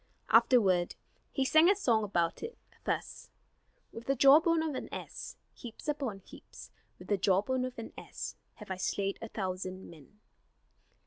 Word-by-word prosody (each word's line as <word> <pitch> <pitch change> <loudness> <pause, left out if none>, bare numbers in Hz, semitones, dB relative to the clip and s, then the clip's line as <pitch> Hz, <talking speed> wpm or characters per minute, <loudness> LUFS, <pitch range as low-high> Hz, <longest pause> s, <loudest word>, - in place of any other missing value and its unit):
Afterward 215 -6 +4 0.4
he 270 - 0
sang 315 +5 +6
a 400 - +5
song 235 - +2
about 170 -5 0
it, 460 +1 -6 0.3
thus: - - -3 0.6
"With 230 - -9
the 275 - +2
jawbone 320 +5 +6
of 315 -2 -2
an - - -5
ass, - - -7 0.2
heaps 240 +3 -11
upon 270 -10 -2
heaps, - - -13 0.3
With - - -13
the 205 -2 +1
jawbone 205 +8 +2
of 255 -1 -7
an 230 - -7
ass, - - -7 0.2
have 210 -3 -10
I 190 - -2
slain 195 +1 -1
a 225 - -6
thousand 185 -2 -5
men." 165 +6 -17
225 Hz, 155 wpm, -31 LUFS, 190-270 Hz, 0.6 s, sang